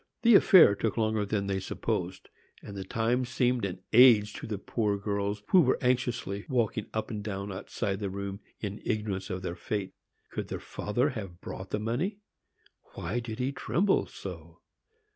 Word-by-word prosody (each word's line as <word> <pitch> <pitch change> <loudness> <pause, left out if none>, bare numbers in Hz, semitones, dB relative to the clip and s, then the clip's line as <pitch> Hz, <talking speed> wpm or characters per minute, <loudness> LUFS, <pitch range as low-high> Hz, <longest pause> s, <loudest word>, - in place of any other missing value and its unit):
The 235 0 +7
affair 185 - +8
took 105 +2 -2
longer 110 -2 +1
than 100 -1 -1
they 100 -1 -1
supposed, 95 - -3 0.3
and 100 - -8
the 95 - -4
time 115 +5 0
seemed 125 -2 +1
an 90 -1 -5
age 110 -3 +7
to - - -7
the 105 -2 -3
poor 105 0 -1
girls, 100 0 -2
who 185 - +7
were 130 -5 +3
anxiously 120 -5 0
walking 115 -4 0
up 110 +2 -3
and 105 -2 -4
down 100 -1 -4
outside 95 +1 -3
the 100 -2 -2
room, 100 0 -5 0.2
in 105 -1 -5
ignorance 105 -3 -2
of 95 -1 -4
their 85 - -3
fate. 100 +1 -3 0.4
Could - - -4
their - - -4
father 120 +7 -1
have 95 -8 -7
brought 95 0 -7
the 105 - -1
money? 130 - -1 0.8
Why 95 +8 -2
did 115 -2 -6
he 130 +2 -1
tremble 190 +7 +1
so? - - -9
105 Hz, 175 wpm, -29 LUFS, 100-120 Hz, 0.8 s, affair